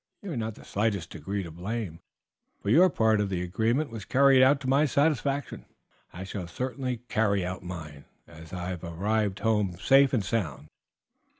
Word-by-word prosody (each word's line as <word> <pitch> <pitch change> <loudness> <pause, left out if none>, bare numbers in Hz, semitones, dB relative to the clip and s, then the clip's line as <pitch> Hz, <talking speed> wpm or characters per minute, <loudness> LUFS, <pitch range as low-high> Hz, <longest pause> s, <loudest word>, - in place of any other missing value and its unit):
You 200 - -5
are - - -3
not 110 -2 -3
in - - -13
the - - -17
slightest 100 -4 -1
degree 95 +5 -4
to 85 - -8
blame, 90 0 -5 0.6
for 100 - -2
your 180 +8 +7
part 110 -7 +2
of 100 - -1
the 90 -2 -2
agreement 115 - 0
was 115 -3 -6
carried 135 +2 +5
out 135 +2 +5
to 130 - -5
my 140 +3 +3
satisfaction. 140 -1 0 0.5
I 90 - -7
shall 95 -2 -6
certainly 125 +4 -4
carry 100 -5 +1
out 90 +1 -5
mine, 80 -5 -8 0.2
as 80 +1 -13
I 90 0 -4
have 90 -2 -5
arrived 100 +4 -1
home 105 -6 +1
safe 135 +5 +5
and 110 -7 0
sound." 80 - -3
105 Hz, 185 wpm, -28 LUFS, 90-130 Hz, 0.6 s, your